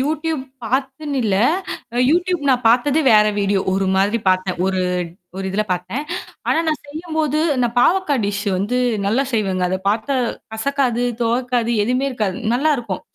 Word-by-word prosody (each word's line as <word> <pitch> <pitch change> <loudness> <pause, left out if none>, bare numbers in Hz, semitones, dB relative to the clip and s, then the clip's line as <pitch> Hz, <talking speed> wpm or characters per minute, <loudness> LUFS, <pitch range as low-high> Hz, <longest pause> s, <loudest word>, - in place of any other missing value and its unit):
YouTube 310 +2 -1 0.2
பாத்துன்னு 270 +4 -2
இல்ல! 195 -3 +1 0.6
அ - - -3
YouTube 355 0 +1
நான் 250 -1 +2
பாத்தது 260 +6 +3
வேற 210 0 +6
வீடியோ. 200 -1 +1
ஒரு 195 0 0
மாதிரி 205 +4 +2
பாத்தேன். 185 0 +1
ஒரு 190 -1 0 0.6
ஒரு 195 - -4
இதில 205 +3 0
பாத்தேன். 185 +11 -3 0.4
ஆனா - - +3
நான் 305 -3 -1
செய்யும்போது 310 -1 -2 0.2
நான் 235 0 0
பாவக்கா 365 0 +3
டிஷ்ஷு 200 0 -2
வந்து 220 +6 0 0.3
நல்லா 230 +7 +2
செய்வேங்க. 195 -5 0
அத 185 - 0
பாத்தா 220 +6 0 0.4
கசக்காது, 245 0 0 0.2
துவக்காது 240 0 0
எதுவுமே 250 +4 0
இருக்காது 210 -7 -2 0.2
நல்லாருக்கும். 245 -8 0
245 Hz, 145 wpm, -20 LUFS, 205-285 Hz, 0.6 s, வேற